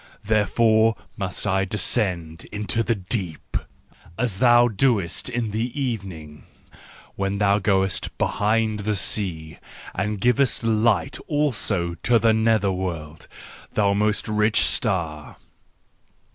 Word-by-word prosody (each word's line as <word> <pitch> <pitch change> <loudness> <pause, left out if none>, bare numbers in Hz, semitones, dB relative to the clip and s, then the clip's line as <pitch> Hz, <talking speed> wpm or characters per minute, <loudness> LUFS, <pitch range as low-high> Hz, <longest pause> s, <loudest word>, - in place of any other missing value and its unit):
Therefore 110 +1 +3 0.2
must 95 -2 -4
I 95 -1 +1
descend 90 -5 -1
into 105 +2 -2
the 115 +1 0
deep, 95 -4 -4 0.6
as 115 -6 -1
thou 120 -1 +6
doest 110 -4 0
in 120 -3 -2
the 115 +6 -3
evening, 95 - -5 0.7
when 100 0 -2
thou 100 0 +3
goest 95 -2 0
behind 110 +1 0
the 105 +1 -1
sea 85 -6 -2 0.3
and 105 +2 -2
givest 125 +3 +2
light 110 -5 +1
also 105 - 0
to 120 -1 +3
the 115 0 +3
nether¬ 110 -3 +2
world, 80 -5 -5 0.5
thou 100 -2 +2
most 105 +1 0
rich 105 +1 +2
star! 80 - 0
105 Hz, 115 wpm, -23 LUFS, 95-115 Hz, 0.7 s, thou